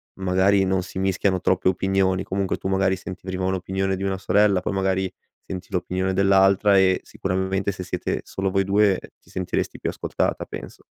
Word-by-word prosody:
magari 95 +1 +2
non 95 -1 +1
si 95 - -7
mischiano 95 0 +1
troppe 95 0 +2
opinioni. 95 0 +1
Comunque 95 -1 -2
tu, - - -5
magari, 95 0 +2
senti 90 0 -8
prima 95 0 -3
un'opinione 95 +1 -1
di 95 - -5
una 95 -1 -1
sorella, 100 0 +3
poi 90 - -2
magari 95 -1 0 0.4
senti 90 -1 -6
l'opinione 95 +1 -1
dell'altra 95 +1 +4
e 95 -1 +4
sicuramente 95 -1 -2
se 95 -1 -7
siete 90 - -3
solo 95 0 -2
voi 95 0 +1
2, 100 -1 +3 0.2
ti - - -24
sentiresti 90 -1 -3
più - - -2
ascoltata, - - -2
penso. - - -9
95 Hz, 175 wpm, -23 LUFS, -, 0.4 s, dell'altra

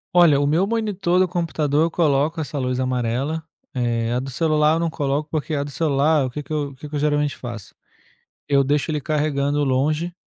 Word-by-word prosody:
Olha 170 -5 +6
o 145 - +1
meu 165 +7 +2
monitor 205 -5 0
do 185 0 +4
computador 160 -3 0
coloca 155 -1 +1
essa 145 -1 -4
luz 125 0 -1
amarela, 130 +5 -1 0.3
eh, 120 -2 -1
a 125 - +1
do 135 +1 -5
celular 155 +2 +2
não 170 - 0
coloco 145 -1 -1
porque 155 0 -2
a 140 - 0
do 145 - -7
celular 150 0 +2
o - - -5
que 150 +4 -6
que 145 - -7
eu 145 -2 -1
o 140 - -14
que 150 +3 -9
que 145 - -14
eu 145 - 0
geralmente 145 -1 +1
faço 120 -4 -8 0.8
eu 140 -1 +4
deixo 145 +3 0
ele 150 - -1
carregando 145 -1 0
longe 150 +6 0
145 Hz, 205 wpm, -22 LUFS, 135-160 Hz, 0.8 s, Olha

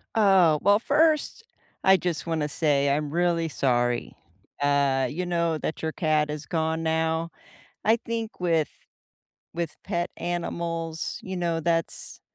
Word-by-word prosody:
Oh. 190 -8 +5
Well, 205 +1 +5
first, 310 - +2 0.4
I 190 - +7
just 175 -3 -3
wanna 160 -3 -1
say 140 -2 +2
I'm 145 +1 0
really 170 0 +1
sorry. 120 -5 0 0.5
Uh, 140 -2 +2
you 180 +7 -3
know, 170 -2 0
that 155 - -4
your 160 - -1
cat 155 -2 +1
is 150 0 -5
gone 160 0 -1
now. 160 +1 0 0.6
I 220 +1 +5
think 230 -3 -4
with 165 -4 +2 0.9
with 170 0 -3
pet 175 +1 -2
animals, 170 -1 -3
you 190 0 -5
know, 170 -2 -1
that's 165 0 -2
165 Hz, 135 wpm, -26 LUFS, 150-175 Hz, 0.9 s, I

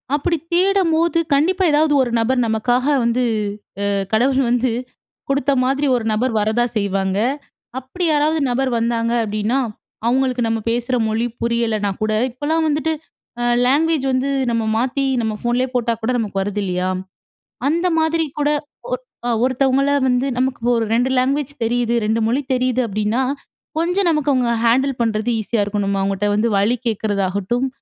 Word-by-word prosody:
அப்படி 330 +3 0 0.2
தேடும்போது 340 -3 +2
கண்டிப்பா 360 +7 +2
ஏதாவது 300 0 +3
ஒரு 245 - 0
நபர், 250 +3 +1
நமக்காக 245 +4 +1 0.2
வந்து 235 +2 +1 0.6
அ - - +1 0.2
கடவுள் 260 +4 +3
வந்து 245 0 +1 0.6
குடுத்த 280 0 +1
மாதிரி 275 +3 +1
ஒரு 230 -2 -2
நபர் 235 +4 0
வரதா 220 +3 +1
செய்வாங்க. 195 -1 -1 0.6
அப்படி 265 +8 -6
யாராவது 305 +1 +2
நபர் 260 +2 0
வந்தாங்க 230 0 0
அப்படின்னா, 215 +5 -1 0.5
அவங்களுக்கு 255 -1 +1
நம்ம 225 0 0
பேசற 240 +2 -1
மொழி 225 +2 0 0.2
புரியலனா 225 -3 0
கூட 215 0 0 0.2
இப்போலாம் 315 +5 -1
வந்துட்டு 305 +1 0 0.5
அ - - 0 0.2
லேங்குவேஜ் 295 +1 +2
வந்து 260 +2 0 0.2
நம்ம 230 -1 0
மாத்தி 265 +3 0 0.2
நம்ம 220 -1 -1
ஃபோன்லே 245 +2 0
போட்டா 235 -1 +1
கூட 235 +3 0
நமக்கு 200 -4 -2
வருது 205 +1 -2
இல்லியா? 180 -1 -1 0.8
அந்த 340 +4 +1
மாதிரி 320 0 +1
கூட 295 0 +2 0.4
ஒ - - +3 0.3
அ - - +1
ஒருத்தவங்களை 270 +2 +2 0.2
வந்து 250 +2 +1
நமக்கு 255 -1 -1 0.2
ஒரு 225 - +1
2 245 +3 +2
லாங்குவேஜ் 275 +2 0
தெரியுது, 240 0 0
2 225 +1 +1
மொழி 250 +5 +1
தெரியுது 255 0 +1
அப்படின்னா, 215 +4 -1 0.6
கொஞ்சம் 355 +2 +1
நமக்கு 300 -2 +1
அவங்க 250 -2 +1 0.2
ஹேண்டில் 260 +3 +2
பண்றது 225 0 0
ஈஸியா 220 +1 -1
இருக்கணும். 200 -1 -1
அவங்கள்ட்ட 195 +1 0
வந்து 220 +3 +2
வழி 215 +5 +2
கேட்கறதாகட்டும். 205 +2 -1
245 Hz, 150 wpm, -19 LUFS, 220-280 Hz, 0.8 s, ஏதாவது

